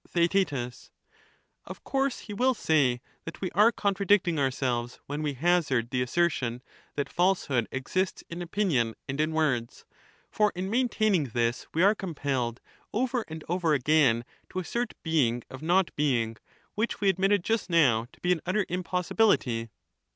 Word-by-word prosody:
TheaeU 165 -9 0 0.8
Of - - -10
course 270 -1 -1
he 210 - -8
will 255 +5 +2
say 135 - +2 0.2
that 165 - -8
we 185 - -3
are 210 +5 +5
contradicting 200 -5 +1
ourselves 125 -3 -1
when 145 +2 -4
we 150 -2 -1
hazard 135 -6 +1
the 125 - 0
assertion, 125 -3 0 0.3
that 145 - -1
falsehood 175 -10 +1
exists 185 +9 -2
in 170 +1 -6
opinion 165 - 0
and 135 +3 -1
in 155 +1 0
words; 140 -7 -1 0.5
for 210 -1 +2
in 185 +2 -3
maintaining 215 - +2
this, 120 -1 -1
we 165 - +3
are 200 +2 +6
compelled 140 - -3 0.3
over 245 +1 -1
and 160 -1 -8
over 170 -3 +1
again 130 -4 +3 0.2
to - - -8
assert 235 +6 -2
being 125 -8 +1
of 130 - -9
not 175 +3 +2
being, 120 -7 0 0.4
which 220 +2 -2
we 200 - +1
admitted 195 0 +2
just 225 -1 -1
now 125 -10 +3
to - - -22
be 180 - +1
an 170 -3 +1
utter 190 +3 0
impossibility. 180 - +1
165 Hz, 150 wpm, -28 LUFS, 130-195 Hz, 0.8 s, are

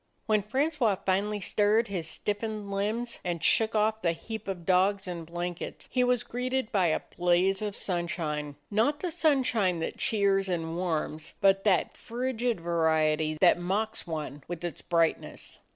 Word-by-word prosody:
When 215 -3 +3
Francois 260 0 +1
finally 205 +2 +1
stirred 210 +4 +2
his 180 -6 -3
stiffened 210 +1 -2
limbs 220 +4 -1
and 175 -3 -3
shook 225 0 +3
off 220 +1 +2
the 170 -1 +2
heap 220 +6 -7
of 180 -4 -4
dogs 190 +2 +2
and 170 -2 -5
blan 175 +1 -3
kets, 170 - -7
he 250 - +2
was 245 -1 +2
greeted 250 0 -2
by 190 -5 +3
a 155 - +1
blaze 180 +3 +2
of 205 -2 -3
sunshine; 160 -5 -2 0.2
not 240 +8 +2
the 360 - -2
sunshine 265 - +2
that - - -3
cheers 200 -4 +2
and 165 -2 -2
warms, 160 -3 -2
but 195 0 +3
that 190 -5 +2
frigid 245 -2 -2
variety 160 -2 +1
that 175 -1 +6
mocks 200 +5 -2
one 150 -3 -5
with 175 -1 -6
its 175 -4 -4
brightness. 165 -1 -1
195 Hz, 160 wpm, -29 LUFS, 170-220 Hz, 0.2 s, that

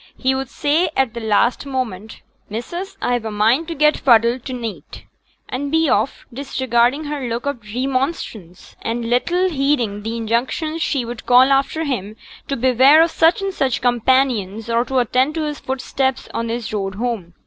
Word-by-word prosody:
He 265 0 +1
would 265 -1 -3
say 315 +5 +1
at 265 -4 +1
the 235 - -5
last 225 +5 +1
moment, 225 -6 -4 0.3
'Missus, 345 - -6
I've 245 -2 0
a 220 - -3
mind 225 +9 +2
to 335 - -4
get 300 0 +4
fuddled 235 0 +3
to 260 - -5
neet,' 230 -4 -7 0.4
and 280 +2 -4
be 320 -1 +2
off, 220 +5 0
disregarding 260 +1 0
her 290 -4 -4
look 235 +2 -3
of 285 -4 -3
remonstrance, 255 - -3
and 230 +1 -3
little 345 +10 +1
heeding 270 - 0
the 225 +2 -4
injunctions 255 +8 -1
she 270 -5 0
would 235 0 -8
call 255 +2 +6
after 275 +4 +1
him 215 -8 -3 0.3
to 275 - -2
beware 260 +5 +6
of 335 - 0
such 330 +5 +3
and 390 -1 -2
such 265 -8 0
companions, 240 -3 +1
or 230 +1 +2
to 265 - -2
attend 255 +4 +1
to 320 - -1
his 300 -1 -4
footsteps 265 0 -2
on 230 0 -2
his 230 -1 -4
road 195 -2 -3
home. 210 -7 -4
255 Hz, 175 wpm, -20 LUFS, 230-280 Hz, 0.4 s, call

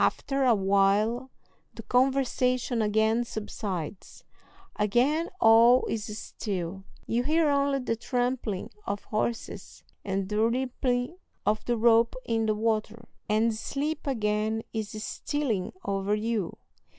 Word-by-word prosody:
After 275 -1 +1
a 240 -3 +5
while 200 +5 +2 0.5
the 225 - -8
conversation 255 -1 +1
again 220 +2 +2
subsides; 200 -6 -6 0.5
again 255 +11 +2
all 230 +2 +6
is 220 -1 -3
still; 190 -3 -5 0.2
you 235 +2 0
hear 310 +2 +3
only 280 0 +2
the 250 -3 -1
trampling 245 -4 -2 0.2
of 200 - -3
horses 225 +2 -4 0.2
and 195 -1 -2
the 210 +1 0
rippling 250 +4 0 0.3
of 210 +1 +1
the 240 -1 0
rope 230 +1 +4
in 225 -1 0
the 215 - +2
water, 225 +1 -1 0.2
and 220 +2 +3
sleep 285 +8 -3
again 220 -3 0
is 220 -2 -3
stealing 255 -12 -2
over 195 +1 0
you. 215 -4 -2
225 Hz, 120 wpm, -28 LUFS, 210-250 Hz, 0.5 s, all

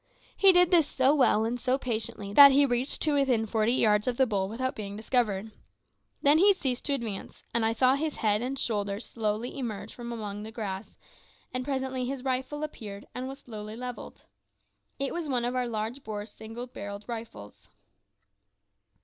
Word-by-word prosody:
He 390 -1 +7
did 360 -1 +5
this 330 -5 +5
so 265 0 +3
well 255 -6 +3
and 240 +2 -2
so 255 +2 +1
patiently 220 -5 -4
that 280 +4 +10
he 280 +1 +5
reached 250 +1 -1
to 305 - +3
within 265 -6 +2
forty 220 +2 +1
yards 210 -3 +3
of 245 -1 0
the 265 - +5
bull 195 -5 -1
without 260 +4 -2
being 200 -2 -6
discovered. 220 -2 0 0.7
Then 290 +2 +6
he 400 +3 +7
ceased 265 -9 -2
to 285 - +1
advance, 225 -7 -6
and 235 - +2
I 225 0 +2
saw 255 +3 +4
his 300 +2 -1
head 210 -1 +1
and 260 +3 -3
shoulders 205 -3 -1
slowly 220 +1 -2
emerge 225 -6 -5
from 240 -1 -7
among 210 -3 -5
the 220 +1 -7
grass, 205 -3 -5 0.6
and 255 0 -2
presently 265 -1 -2
his 260 0 -4
rifle 265 +3 -2
appeared, 205 -9 -7
and 255 +1 -4
was 270 +1 -8
slowly 215 -2 -8
levelled. 250 +1 -8 0.7
It 275 0 -2
was 340 -3 -3
one 245 -3 0
of 245 +1 -2
our 250 -1 0
large 230 +4 -4
bore 210 -1 -5
single 225 +3 -8
barrelled 205 -4 -8
rifles. 225 - -8
240 Hz, 185 wpm, -28 LUFS, 215-265 Hz, 0.7 s, that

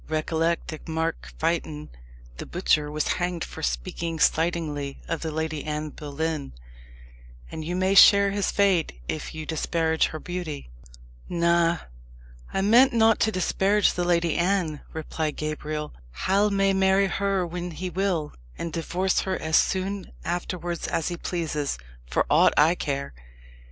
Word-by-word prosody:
"Recollect 160 +2 0
that 155 +1 -8
Mark 160 0 -2
Fytton, 155 -2 -2 0.5
the - - -7
butcher, 155 -4 +1
was 150 +1 -1
hanged 175 -1 -1
for - - -8
speaking 65 - -2
slightingly 155 -4 0
of 165 - -2
the 160 - -2
Lady 160 -1 -3
Anne 150 0 -3
Boleyn; 150 - -4 1.0
and 160 - -5
you 175 +3 -3
may 185 +1 +2
share 200 +1 +8
his 200 0 0
fate 185 - +2
if 155 - -4
you 155 -1 -5
disparage 160 0 +1
her 155 - -6
beauty." 165 - -6 0.6
"Na 170 0 +3 0.7
I 195 - 0
meant 235 +7 +6
not 225 -1 +4
to 220 - +2
disparage 195 +2 +2
the 180 - -1
Lady 170 -2 +2
Anne," 175 -4 0
replied 155 -1 -3
Gabriel. 155 0 -4 0.3
"Hal 200 +2 +3
may 195 -1 +2
marry 190 +1 +4
her 195 -1 0
when 175 +1 -5
he 180 +2 -5
will, 175 -4 -1 0.2
and 165 -2 -5
divorce 180 +3 0
her 190 -1 -1
as 160 0 0
soon 190 +1 +1
afterwards 175 0 -3
as 165 - -1
he 175 - -3
pleases, 155 - -2 0.3
for - - +1
aught - - +4
I 155 +3 +6
care. 140 - -3
170 Hz, 145 wpm, -25 LUFS, 155-185 Hz, 1.0 s, share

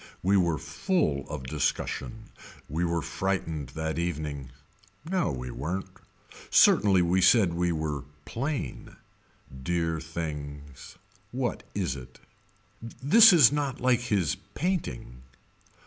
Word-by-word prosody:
We 95 +2 +3
were 85 -5 +2
full 85 - -1
of 75 -3 -5
discussion. 75 - -3 0.4
We 80 +5 -2
were 85 -2 0
frightened 80 -8 -3
that 80 +1 -2
evening. 75 -5 -3 0.6
No 180 - 0
we 65 -2 -5
weren't. 90 +7 -4 0.6
Certainly 95 -3 +5
we 90 +2 +2
said 95 -3 +5
we 85 0 0
were 75 -4 -3 0.2
plain. 135 - -4 0.7
Dear 80 +1 -1
things. 75 -3 -7 0.4
What 125 -1 -2
is 90 -9 -1
it. 65 -1 -11 0.6
This 165 - +6
is 155 -9 +7
not 145 -3 -2
like 125 -1 +3
his 100 -9 0 0.2
painting. 145 - -3
85 Hz, 115 wpm, -27 LUFS, 75-115 Hz, 0.7 s, is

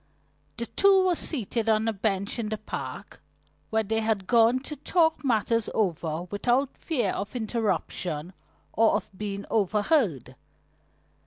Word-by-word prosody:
The 235 - -3
two 390 +6 +4
were 365 - +3
seated 230 - -2
on 220 0 +2
a 225 - +1
bench 200 +1 -1
in 215 -2 -2
the 215 - -2
park, - - -7 0.5
where 220 0 +1
they 220 +2 0
had 220 -3 0
gone 230 +3 +4
to 300 +2 -6
talk 320 +2 +1
matters 230 -3 +1
over 165 -5 -1
without 245 +6 +1
fear 245 - -1
of 205 +4 -5
interruption 190 -7 -2 0.4
or 225 0 +4
of - - -3
being 200 0 -5
overheard. 205 - +1
220 Hz, 140 wpm, -27 LUFS, 200-245 Hz, 0.5 s, two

